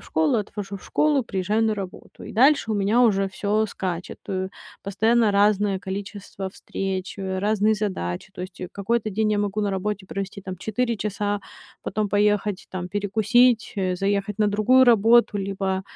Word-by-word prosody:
в - - -16
школу, 160 +8 +2
отвожу 200 -1 -5
в - - -19
школу, 300 -3 +2
приезжаю 205 0 -1
на 220 -1 +2
работу. 195 -3 -9
И - - -8
дальше 260 0 +4
у - - +1
меня 205 +4 +3
уже 195 -4 +3
всё 210 +3 0
скачет, 185 -4 -5
э. 190 -1 -2 0.3
Постоянно 220 +3 +2
разное 200 -1 +2
количество 195 0 -6
встреч, 190 0 -5
э, 190 -1 -3
разные 215 +1 +2
задачи. 185 - -3
То - - -9
есть, 180 -1 -7
э, 180 - -5
какой-то 215 +2 -1
день 215 +2 0
я 210 - +1
могу 205 0 -1
на 205 -1 0
работе 195 0 -3
провести 195 0 -5
там 185 -1 -7
4 230 +5 -1
часа, 205 0 -2 0.4
потом 215 -1 -2
поехать 205 -1 +1
там 180 -1 -5
перекусить, 220 +5 +2
э, 185 -2 0
заехать 200 +1 -1
на 210 - +3
другую 215 +6 +4
работу 230 -1 +5
либо, 195 -1 -2
205 Hz, 175 wpm, -24 LUFS, 190-215 Hz, 0.4 s, работу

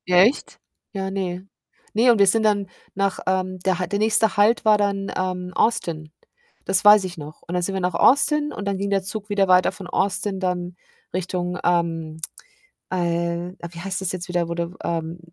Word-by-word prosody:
Echt? 215 +11 +3 0.3
Ja, 190 -1 -3
ne. 185 -1 -4 0.5
Ne, 235 +3 +5
und 225 - +2
wir 200 - +6
sind 220 +3 +3
dann 205 -2 +2 0.3
nach, 195 -1 0
ähm, 185 0 -1
der 185 0 0
H 180 - -1
der 200 0 -2
nächste 215 -1 +2
Halt 215 +3 +4
war 215 -1 +6
dann, 200 -1 -1
ähm, 180 -1 -3
Austin. 160 -9 0 0.5
Das 190 +1 +1
weiß 210 -1 +8
ich 180 -1 -7
noch. 150 +1 -10
Und 175 - -5
dann 180 - +1
sind 195 - -1
wir 190 - -2
nach 180 -1 0
Austin 295 - +3
und 205 - -6
dann 195 - -1
ging 200 +1 -2
der 195 -1 +1
Zug 210 +1 -5
wieder 200 -1 +2
weiter 185 0 +4
von 190 - -9
Austin 195 +1 -1
dann 180 -1 -2 0.4
Richtung, 180 0 -2
ähm, 165 -2 0 0.7
äh 170 -1 -1
äh - - -12 0.2
wie 170 - -10
heißt 190 +2 -4
das 185 - -1
jetzt 180 0 -5
wieder? 175 -1 0
Wo 170 - -3
du 170 0 -3
w - - -21
ähm 165 0 -3
185 Hz, 205 wpm, -22 LUFS, 175-200 Hz, 0.7 s, weiß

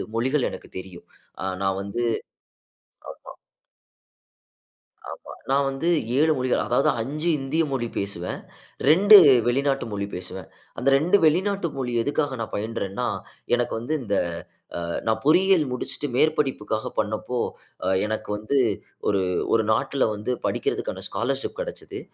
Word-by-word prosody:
மொழிகள் 130 +4 +1
எனக்கு - - -10
தெரியும். 90 -2 -11 0.6
நான் 95 0 +1
வந்து 100 +4 -4 1.3
ஆமா. - - -10 1.7
ஆமா, - - -9 0.2
நான் 140 +1 +3
வந்து 135 +5 -2 0.3
7 155 +2 +4
மொழிகள் 130 0 +1
அதாவது 120 - +2
5 150 +8 -2
இந்திய 140 +5 0
மொழி 130 -3 -1
பேசுவேன். 100 -3 -3 0.5
2 200 +7 +9 0.3
வெளிநாட்டு 135 +2 +1
மொழி 100 -1 -2
பேசுவேன். 90 -1 -7 0.3
அந்த 125 - 0
2 170 +8 +4
வெளிநாட்டு 185 +3 +2
மொழி 125 -2 -2
எதுக்காக 145 0 -1
நான் 110 - -5
பயின்றேன்னா, 110 +1 -3 0.5
எனக்கு 120 0 0
வந்து 120 +7 -2
இந்த 105 -4 -2 0.9
நான் 110 0 +1
பொறியியல் 175 0 +5
முடிச்சுட்டு 125 +3 -3
மேற்படிப்புக்காக 135 -9 0
பண்ணப்போ 110 +3 -2 0.7
எனக்கு 110 0 -4
வந்து 110 +7 -1 0.5
ஒரு 100 -2 +2 0.3
ஒரு 110 -1 +3
நாட்ல 135 +2 0
வந்து 105 +5 -2
படிப்பதற்கான - - -2
ஸ்காலர்ஷிப் 135 - -2
கிடைச்சது. - - -6
130 Hz, 120 wpm, -24 LUFS, 110-150 Hz, 1.7 s, 2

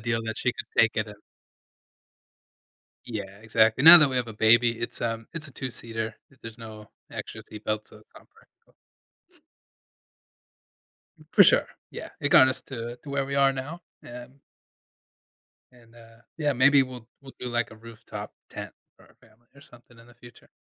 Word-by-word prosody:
deal 115 0 -1
that 110 -1 -5
she - - -1
could - - -8 0.2
take 115 0 +2
it 110 - 0
and 105 0 -13 1.9
Yeah. 110 -4 -4 0.2
Exactly. 110 +3 +2
Now 170 +2 +12
that 150 -4 +4
we 130 - -3
have 125 -1 -1
a - - -7
baby, 115 +2 +3
it's 120 - -4
um, 115 -1 -3
it's 165 -2 -3
a - - -15
two-seater. 115 -4 -5 0.3
There's 115 0 -10
no 110 -2 -11 0.2
extra - - -7
seat 105 0 -11
belt, 110 0 -3
so - - -16
it's 105 - -25
not - - -17
practical. - - -28 2.6
For - - +8
sure, - - +4 0.2
yeah, - - -8
it - - -1
got 130 - +7
us 130 - -3
to 120 -2 -7
to 145 - -10
where 140 -1 -1
we 140 +1 -5
are 140 -1 +4
now, 140 +6 -7 0.3
um 125 +3 -12 1.3
And, 120 -2 -22
uh, 115 -1 -18 0.2
yeah, 150 -2 +1
maybe 140 +2 +5
we'll 125 -3 -9
we'll 135 -1 -13
do, 125 - -7
like, 120 -1 -2
a 110 - -13
rooftop 115 0 -10 0.2
tent - - -8 0.2
for - - -21
our - - -24
family 115 +1 -26
or 140 - -17
something 120 -4 -19
in 115 - -17
the 120 - -19
future. 120 0 -17
120 Hz, 175 wpm, -26 LUFS, 115-130 Hz, 2.6 s, Now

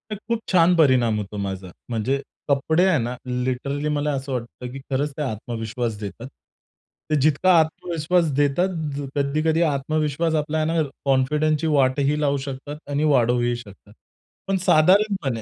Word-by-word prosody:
खरंच - - -11
खूप 230 - +1
छान 180 -1 +5
परिणाम 125 -8 +4
होतो 105 0 -6
माझा. 95 -2 -4 0.2
म्हणजे 120 +4 -1 0.3
कपडे 160 +5 +2
आहे 185 -4 +3
ना 120 +1 -3
लिटरली 130 +4 -2
मला 150 0 0
असं 135 0 -4
वाटतं 125 0 -6
की 135 - -7
खरंच 140 +3 0
ते - - -3
आत्मविश्वास 115 -2 -3
देतात. 110 +4 -7 0.8
ते 155 - +2
जितका 155 +5 +3
आत्मविश्वास 165 +1 0
देतात 145 +6 +2 0.5
कधी-कधी 155 +3 +1
आत्मविश्वास 155 +1 0
आपल्याला 155 +1 0
आहे 165 - +2
ना - - -5 0.2
कॉन्फिडन्सची 150 +3 +1
वाटही 140 0 +2
लावू 140 -1 +1
शकतात 140 +2 -6
आणि 145 +1 0
वाढवूही 120 -4 +2
शकतात. 105 -3 -13 0.5
पण 195 0 +1
साधारणपणे 175 - +3
140 Hz, 145 wpm, -23 LUFS, 125-155 Hz, 0.8 s, छान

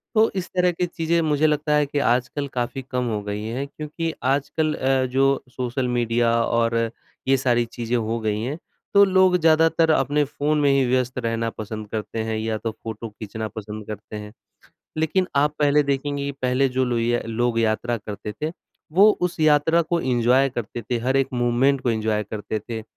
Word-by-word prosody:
तो 220 +1 +5
इस 185 -1 -2
तरह 180 0 +3
की 175 +1 -1
चीज़ें, 170 -1 0
मुझे 155 -1 +2
लगता 150 0 +1
है 150 0 +3
कि 145 +1 -2
आजकल 125 +3 0
काफ़ी 125 +2 -2
कम 125 -1 0
हो 105 -2 -2
गई 105 +1 -4
हैं, 120 +5 -3
क्योंकि 155 +3 -5
आजकल 145 +4 0
अ, 130 -1 +1
जो 135 +2 +2
सोशल 125 +1 -2
मीडिया 120 -1 +1
और 115 0 +1 0.5
ये 135 0 +4
सारी 120 -2 +2
चीज़ें 115 +1 -3
हो 115 0 -1
गई 110 -1 -1
हैं, 135 +7 -3 0.4
तो 200 - +8
लोग 185 -1 +4
ज़्यादातर 160 0 +4
अपने 145 0 +2
फ़ोन 145 +1 -1
में 145 - +4
ही 135 -1 +3
व्यस्त 125 0 0
रहना 115 0 -1
पसंद 110 0 -6
करते 110 0 -4
हैं 110 - -1
या 110 0 -2
तो 115 +1 -3
फोटो 115 0 -6
खींचना 110 +1 -6
पसंद 105 0 -8
करते 105 0 -8
हैं। 105 0 -7 0.7
लेकिन 160 +4 +1
आप 145 +1 +3
पहले 150 0 +4
देखेंगे 140 0 -2
कि 140 - -2
पहले 130 +2 +2
जो 130 0 0
लुइया 120 -1 0
लोग 115 +1 0
यात्रा 115 +2 0
करते 105 0 -7
थे, 155 +8 -4 0.4
वो 200 +6 +7
उस 180 -1 -1
यात्रा 155 +2 +4
को 170 +1 -1
एन्जॉय 125 0 +3
करते 120 -1 -5
थे, 120 +2 -2
हर 130 +3 +1
एक 135 -1 +2
मोमेंट 125 +3 +2
को 125 - 0
एन्जॉय 110 -1 0
करते 110 0 -3
थे, 110 +1 -6
125 Hz, 190 wpm, -23 LUFS, 115-150 Hz, 0.7 s, तो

